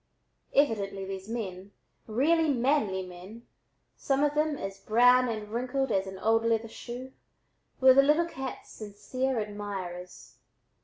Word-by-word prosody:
Evidently 200 -8 +1
these 190 +1 -7
men, 200 -4 -5 0.3
really 305 +8 +2
manly 240 -7 +1
men, 185 +6 -11 0.5
some 275 +1 0
of 295 0 +2
them 300 -1 +1
as 195 -3 -6
brown 245 +4 +4
and 215 -2 -4
wrinkled 255 +2 -1
as 195 -1 +1
an 190 0 -7
old 225 +3 +2
leather 230 0 +1
shoe, 250 +3 -8 0.7
were 260 0 +8
the 275 - +7
little 300 +4 +3
cat's 265 -6 -7
sincere 250 +5 -3
admirers. 200 -4 -6
230 Hz, 135 wpm, -29 LUFS, 195-265 Hz, 0.7 s, were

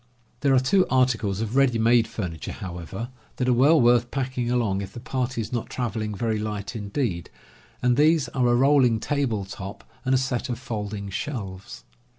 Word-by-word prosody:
There 135 -1 +3
are - - +6
two 180 +9 +3
articles 115 -6 +1
of 115 +2 -3
ready 135 -4 +4
made 115 +1 +4
furniture, 90 -7 -5
however, 95 +5 -6 0.3
that 125 - -1
are 125 - +4
well 145 +7 +5
worth 120 -1 +4
packing 130 -2 -2
along 115 -6 +1
if 100 0 -7
the - - -7
party 130 -1 -2
is 110 - -6
not 120 - -2
traveling 110 -3 -3
very 110 +1 -1
light 105 +1 -4
indeed, 100 - -2 0.5
and 125 0 +4
these 155 -1 +4
are 125 -1 +1
a 120 - +4
rolling 130 -3 +4
table 120 -6 -1
top 100 +1 -8 0.2
and 130 0 +2
a - - +5
set 130 0 -2
of 120 - -2
folding 105 -5 -5
shelves. 95 - -5
120 Hz, 180 wpm, -25 LUFS, 105-130 Hz, 0.5 s, are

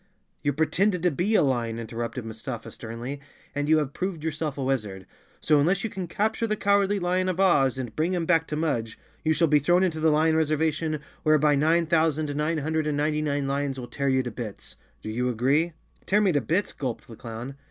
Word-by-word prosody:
"You 145 - +1
pretended 175 +5 +1
to 180 - +3
be 180 +9 0
a - - +5
lion," 120 -4 0
interrupted 115 +2 -5
Mustafa 115 +1 -6
sternly, 120 +5 -7 0.3
"and 145 0 -2
you 160 - +6
have 145 -2 -1
proved 185 -4 -3
yourself 155 -2 -3
a 135 - -2
wizard. 105 -8 -2 0.4
So 150 -2 +4
unless 180 +7 +2
you 225 - -2
can 185 -2 -5
capture 220 +5 0
the 215 - 0
Cowardly 200 0 +2
Lion 185 0 0
of 185 0 -2
Oz 140 -9 +4
and 120 -4 -5
bring 170 +4 0
him 170 -2 -1
back 165 -1 +2
to 150 - -3
Mudge, 120 -9 -1 0.3
you 160 - +3
shall 165 +1 +3
be 150 0 +4
thrown 175 +6 +3
into 165 -4 0
the 160 0 +3
lion 155 +1 +3
reservation, 155 0 0 0.2
whereby 155 -1 +4
nine 160 +4 +3
thousand 155 -2 +1
nine 155 +2 0
hundred 155 +1 -1
and 150 -1 0
ninety 150 +1 +1
nine 145 -2 -1
lions 140 -1 -1
will 125 - -5
tear 140 +3 -2
you 130 0 +2
to 120 - -4
bits. 110 -3 -7 0.3
Do - - -5
you 125 +3 0
agree?" 140 +8 +1 0.3
"Tear 205 +3 +4
me 200 -3 +3
to 145 -3 +1
bits!" 170 - 0
gulped 130 -5 -4
the 115 - -10
clown. 115 +4 -7
150 Hz, 215 wpm, -26 LUFS, 130-165 Hz, 0.4 s, you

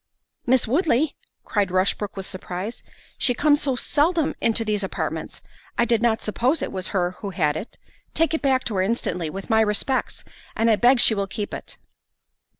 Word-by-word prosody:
"Miss 255 -1 +3
Woodley!" 285 - +1 0.3
cried 205 -4 0
Rushbrook 190 +2 0
with 190 - -5
surprise, 185 +3 -6 0.4
"she 245 - +2
comes 295 +2 +3
so 270 -3 +1
seldom 310 +5 +2
into 225 0 +2
these 210 -1 -1
apartments, 190 - -4 0.3
I 235 - +3
did 230 -2 +1
not 230 -2 +1
suppose 250 +8 +1
it - - -3
was 185 -2 -2
her 180 -2 0
who 205 - -4
had 150 -6 0
it—take 315 - -4
it 320 - 0
back 265 -2 +2
to 215 - -3
her - - +3
instantly, 180 -5 -1
with 195 +7 -6
my 220 0 +5
respects, 220 +5 0 0.3
and 225 0 +3
I - - +5
beg 245 +4 +4
she 240 - +6
will 200 -2 -1
keep 205 +1 -5
it." - - -8
225 Hz, 180 wpm, -23 LUFS, 195-260 Hz, 0.4 s, she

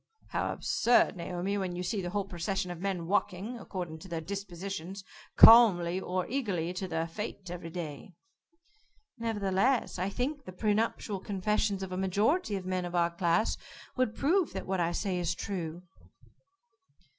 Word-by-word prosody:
"How - - -1
absurd, 245 - +3
Naomi, 180 +3 -2
when 185 -2 -2
you 180 - -3
see 195 +3 -1
the 175 - -3
whole 200 +1 -1
procession 185 +1 -2
of 175 - -7
men 190 -3 -2
walking, 205 +5 -1
according 175 -7 -6
to 175 - -11
their 170 -2 -3
dispositions 195 +1 -5 0.3
calmly 185 -7 +8
or 185 -1 -2
eagerly 195 -10 -2
to 190 +1 -4
their 165 -1 -1
fate 190 0 -6
every 175 -1 -6
day." 165 0 -7 1.0
"Nevertheless, 220 0 +1
I 185 +2 0
think 275 +7 -3
the 185 - -8
pre 210 +3 +1
nuptial 215 -2 -1
confessions 200 0 0
of 190 - -6
a 185 - -3
majority 205 - +1
of 190 -2 -4
men 185 -1 -1
of 175 0 -5
our 170 0 +3
class, 170 +4 +1 0.4
would 255 -4 0
prove 345 +4 +2
that - - -4
what 190 0 -1
I 170 0 +1
say 185 0 -1
is 170 0 -1
true." 175 -3 -4
190 Hz, 165 wpm, -30 LUFS, 175-210 Hz, 1.0 s, calmly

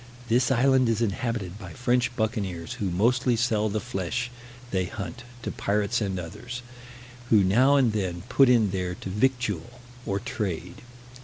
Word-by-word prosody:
This 120 +2 +3
island 130 -1 +4
is 115 0 +1
inhabited 105 -2 -2
by - - -9
French 125 -1 +1
buccaneers, 100 -7 -2
who 100 - 0
mostly 120 +7 +2
sell 110 -2 +1
the 110 +1 -1
flesh 105 +6 -3 0.4
they 95 -1 +1
hunt 110 +6 -6 0.2
to - - -2
pirates 105 +3 0
and 95 -3 -1
others, 120 +8 -7 0.7
who 105 -3 +6
now 125 +9 +5
and 125 -6 +3
then 90 -4 -2
put 130 +1 +5
in 115 -5 +4
there 90 -1 -2
to 95 - -7
victual, 120 -1 -1 0.3
or 100 0 0
trade. 90 -4 -4
110 Hz, 155 wpm, -26 LUFS, 95-125 Hz, 0.7 s, who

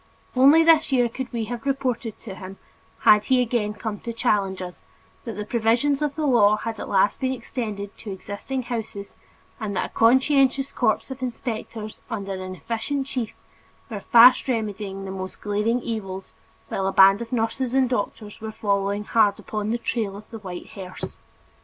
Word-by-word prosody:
Only 280 +6 +7
this 320 -2 +5
year 245 -2 +4
could 260 +2 -6
we 230 -2 -2
have 235 +1 -5
reported 255 -5 -1
to 205 - -7
him, 190 0 -9 0.4
had 210 0 +6
he 260 -1 +3
again 230 -4 0
come 210 -1 -4
to 235 - -5
challenge 205 -5 0
us, 180 -1 -7 0.4
that 230 - -4
the 210 0 -5
provisions 240 +6 +2
of 295 -2 -1
the 310 - -1
law 215 -6 +5
had 225 0 -5
at - - -6
last 195 +1 +3
been 260 0 0
extended 220 -5 -5
to 210 - -7
existing 205 +7 -5
houses 220 -4 -5 0.5
and 210 -3 -3
that - - -2
a - - -32
conscientious 265 +3 +4
corps - - 0
of 265 0 -7
inspectors 225 -3 -5
under 200 -4 -4
an 185 0 -6
efficient 250 +7 -3
chief, 250 -5 -4 0.6
were 210 - -3
fast 240 +6 +7
remedying 205 -5 -3
the 190 - -5
most 190 0 -6
glaring 210 +4 0
evils, 195 -4 -5 0.4
while 195 - -1
a - - +1
band 195 +2 +6
of 230 - -6
nurses 245 +2 -1
and 265 -1 +4
doctors 210 -3 -3
were 220 0 -5
following 200 -1 0
hard 210 -2 +3
upon 210 -1 -4
the 235 - +1
"trail 220 -4 -2
of 210 - -12
the 225 - -7
white 180 -4 -8
hearse." 185 -2 -8
225 Hz, 180 wpm, -24 LUFS, 200-250 Hz, 0.6 s, Only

